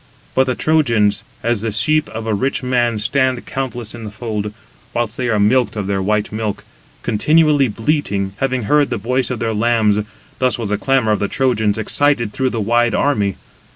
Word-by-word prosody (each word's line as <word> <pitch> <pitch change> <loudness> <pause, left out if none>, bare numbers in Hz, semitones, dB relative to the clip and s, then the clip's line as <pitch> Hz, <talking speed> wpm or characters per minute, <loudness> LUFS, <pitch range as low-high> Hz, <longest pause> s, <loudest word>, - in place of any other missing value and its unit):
But 130 - +3
the 130 - 0
Trojans, 115 -10 +2 0.2
as 115 -2 0
the 115 0 -2
sheep 155 +9 +2
of 110 0 -6
a 110 - 0
rich 130 +6 -1
man 120 -3 +1
stand 130 +3 0
countless 125 -4 -5
in 120 -1 -9
the 105 - -5
fold, 105 -1 -4 0.4
whilst 120 -1 -1
they 125 -1 -2
are 110 -2 +1
milked 120 +5 +2
of 105 -2 -3
their 100 0 -1
white 105 +2 0
milk, 110 -1 -3 0.4
continually 150 +4 +3
bleating, 105 -5 -1
having 130 -2 -1
heard 145 +6 +2
the - - -2
voice 125 +5 0
of 125 - -2
their 115 -1 -2
lambs—thus 110 +2 0
was 115 -4 -4
the 105 - 0
clamour 135 -5 +2
of 105 - +1
the 100 - 0
Trojans 110 -5 +1
excited 120 -1 +3
through 130 -1 0
the 115 - -3
wide 120 +2 +2
army. 105 -9 +1
115 Hz, 190 wpm, -18 LUFS, 105-130 Hz, 0.4 s, But